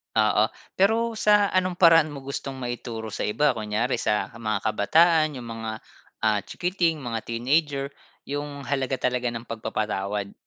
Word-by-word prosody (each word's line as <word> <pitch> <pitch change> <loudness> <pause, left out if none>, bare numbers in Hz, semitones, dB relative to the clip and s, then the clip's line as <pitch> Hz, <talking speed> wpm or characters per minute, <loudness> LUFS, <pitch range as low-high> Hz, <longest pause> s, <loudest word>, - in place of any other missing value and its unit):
Oo, 110 0 +4 0.3
pero 225 +3 +2
sa 210 -1 +4
anong 185 -1 +1
paraan 165 -3 +5
mo 140 - -7
gustong 135 0 -5
maituro 120 -2 -5
sa - - -3
iba? 145 +8 +2
Kunyari 110 +4 -1
sa 105 -2 0
mga 110 -3 -2
kabataan, 155 - +3
yung 120 - -9
mga, 110 -1 -5 0.4
ah, 110 -1 +2
chikiting, 175 -4 -1
mga 115 -3 -3
teenager, 140 +4 0 0.4
yung 145 0 -4
halaga 135 -1 -2
talaga 125 -1 0
ng 115 - -5
pagpapatawad? 105 -3 -3
130 Hz, 145 wpm, -25 LUFS, 110-155 Hz, 0.4 s, paraan